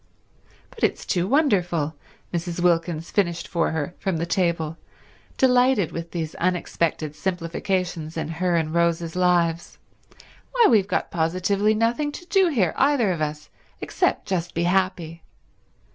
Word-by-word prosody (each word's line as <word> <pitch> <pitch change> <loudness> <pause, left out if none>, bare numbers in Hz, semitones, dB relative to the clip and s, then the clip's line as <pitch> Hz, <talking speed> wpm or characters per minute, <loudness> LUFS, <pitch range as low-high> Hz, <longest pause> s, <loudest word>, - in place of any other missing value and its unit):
"But - - -11
it's - - +1
too 180 -1 0
wonderful," 180 - +1 0.4
Mrs. 175 0 -3
Wilkins 170 -2 0
finished 175 -4 0
for 170 -1 0
her 160 +1 -3
from 190 -4 -1
the 165 - -1
table, 170 -3 -1 0.6
delighted 250 -7 +3
with 170 0 -6
these 160 -3 -4
unexpected 170 -3 -1
simplifications 175 -1 -2
in 160 - -2
her 175 +2 -1
and 160 -1 0
Rose's 170 -1 0
lives. 175 -2 +1 0.8
"Why, 480 -2 +5
we've 205 -4 +4
got 185 - -1
positively 185 +5 +1
nothing 235 +7 0
to 350 - -9
do 385 0 +3
here, 225 - +1
either 270 -7 +3
of 170 -3 -3
us, 150 0 -4 0.3
except - - 0
just 175 -2 -2
be 170 - 0
happy. 175 -3 0
175 Hz, 140 wpm, -24 LUFS, 165-195 Hz, 0.8 s, Why